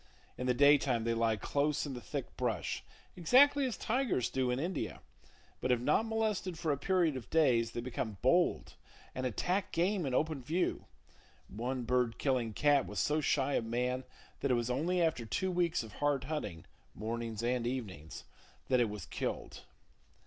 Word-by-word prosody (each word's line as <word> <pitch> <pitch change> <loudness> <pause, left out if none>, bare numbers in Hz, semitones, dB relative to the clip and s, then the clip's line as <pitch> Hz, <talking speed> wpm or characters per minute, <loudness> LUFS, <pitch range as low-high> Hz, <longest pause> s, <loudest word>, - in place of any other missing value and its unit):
In 125 - -4
the 125 - +2
daytime 140 -4 +4
they 115 0 +1
lie 115 -1 +2
close 145 +9 0
in 140 - -5
the 125 - -6
thick 95 - -5
brush, - - -2 0.3
exactly 270 - +5
as 245 - -4
tigers 240 - 0
do 130 -1 0
in 125 +1 0
India, 175 +6 -3 0.6
but 130 - 0
if 125 - +3
not 150 - +2
molested 215 -5 -1
for 160 -2 -1
a 140 - 0
period 175 -4 +2
of 130 - -7
days, 125 -8 +3
they 120 - -4
become 115 -4 -4
bold 175 +7 +2 0.4
and 130 0 -2
attack 180 - -1
game 180 -1 +1
in 130 - -1
open 155 -2 0
view. 165 +8 -1 0.6
One 125 +4 -3
bird 125 -1 +1
killing 125 -5 0
cat 145 +3 +3
was - - -7
so 150 +1 +1
shy 140 -1 +1
of 115 - 0
man 125 +3 -1 0.4
that 140 - -1
it 125 - +4
was 120 +1 -1
only 170 +8 0
after 160 -8 +1
two 185 - -1
weeks 175 -3 +1
of 110 - -11
hard 145 -2 0
hunting 105 - -4 0.3
(mornings 115 0 -4
and 120 0 0
evenings) 95 - -5 0.5
that 130 -1 +4
it 120 -3 +2
was 105 -4 -6
killed. - - -4
130 Hz, 180 wpm, -33 LUFS, 120-165 Hz, 0.6 s, exactly